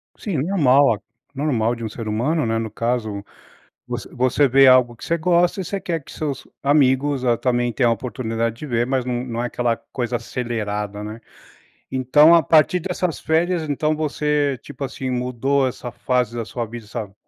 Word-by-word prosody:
Sim, 195 -8 -4
normal 145 - +4
a 100 - -14 0.3
normal 120 -5 0
de 115 - -8
um 110 - -3
ser 115 0 -7
humano, 125 +7 0
né. 115 0 0
No 110 -2 -3
caso, 110 -4 -2 0.6
você - - -5
você 130 +3 +2
vê 135 +1 +6
algo 125 -2 +5
que - - -14
você 170 - 0
gosta 175 +3 +2
e - - -3
você 200 +2 -3
quer 165 -4 -3
que - - -13
seus 145 -4 -4 0.2
amigos, 140 -1 +2
ah, 120 -2 +3
também 120 -1 0
tenham 120 -3 +2
a - - +4
oportunidade 115 -2 -3
de 150 - -7
ver 120 -3 0
mas 130 -2 0
não 125 -1 -2
não 120 -1 -3
é - - -1
aquela 120 -1 0
coisa 120 0 -4
acelerada, 105 -4 -3
né. 110 +2 -7 0.7
Então 140 +5 +5
a 165 - +6
partir 160 +3 +4
dessas 180 -1 -2
férias 165 0 0
então 150 +2 0
você, 150 -3 0
tipo, 145 -1 -10
assim, 130 0 -4
mudou 125 +2 0
essa 120 0 -7
fase 120 -1 -1
da 115 - -2
sua 120 +2 -4
vida 115 0 -9
essa 105 -2 -6
125 Hz, 190 wpm, -21 LUFS, 115-150 Hz, 0.7 s, vê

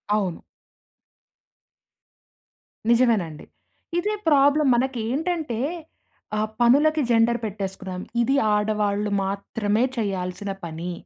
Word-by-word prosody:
అవును. 190 -5 -1 2.5
నిజమేనండి. 225 -11 +2 0.5
ఇదే 420 +4 -1
ప్రాబ్లమ్ 290 -1 +4
మనకెంటంటే, 265 +3 -1 0.8
ఆహ్, 215 0 0
పనులకి 295 +6 +4
జెండర్ 235 +1 +3
పెట్టేసుకున్నాం. 190 -2 -5 0.2
ఇది 270 +4 +2 0.2
ఆడవాళ్ళు 210 -1 0
మాత్రమే 205 +3 -1
చేయాల్సిన 195 -2 -3
పని. 165 +2 -5
220 Hz, 75 wpm, -24 LUFS, 200-260 Hz, 2.5 s, ప్రాబ్లమ్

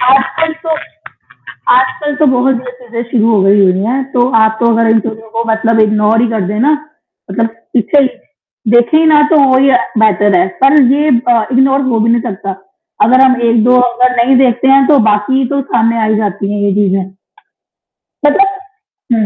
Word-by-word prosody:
आजकल 275 +5 -1
तो 320 - -1 1.0
आजकल 260 +3 -1
तो 305 - +1
बहुत 255 +1 +1
गलत 250 +1 -8
चीज़ें 235 0 -6
शुरू 230 -2 +1
हो 205 - +2
गई 200 +1 +3
हुई 185 -1 +2
है, 260 +5 -2
तो 245 -1 +1
आप 220 0 +1
तो 235 0 +2
अगर 230 0 +1
इंटरव्यू 225 0 -2
को 230 +1 -2
मतलब 225 0 0
इग्नोर 215 +1 +1
ही 240 - +1
कर 220 -2 -2
देना 220 +9 0 0.6
मतलब 225 +3 -1 0.3
पीछे 250 +5 +2
ही - - +1 0.6
देखे 240 +6 +3
ही 320 - +2
ना, 305 -2 +4
तो 310 - +4
वही 265 +1 +3
अ, 250 - +4 0.2
बेटर 205 -3 +2
है। 180 - +1 0.2
पर 280 +2 +5
ये 295 +1 0 0.2
प 230 -2 +1
इग्नोर 270 +2 +2
हो 230 -2 0
भी 225 +1 +1
नहीं 235 0 +1
सकता, 195 -4 -6 0.5
अगर 255 +4 +3
हम 255 -2 +1
1-2 235 +2 +2
अगर 250 +1 0
नहीं 265 +1 +2
देखते 250 +2 -1
हैं, 270 0 +4
तो 290 -3 +3
बाकी 250 +6 0
तो 280 -1 -1
सामने 230 0 +1
आ - - +1
ही 215 0 0
जाती 205 -1 -3
है 205 -1 -3
ये 200 - 0
चीज़ें। 195 -2 0 1.2
मतलब 390 +5 +1 0.5
हुँ। 220 -2 0
235 Hz, 190 wpm, -11 LUFS, 220-265 Hz, 1.2 s, पर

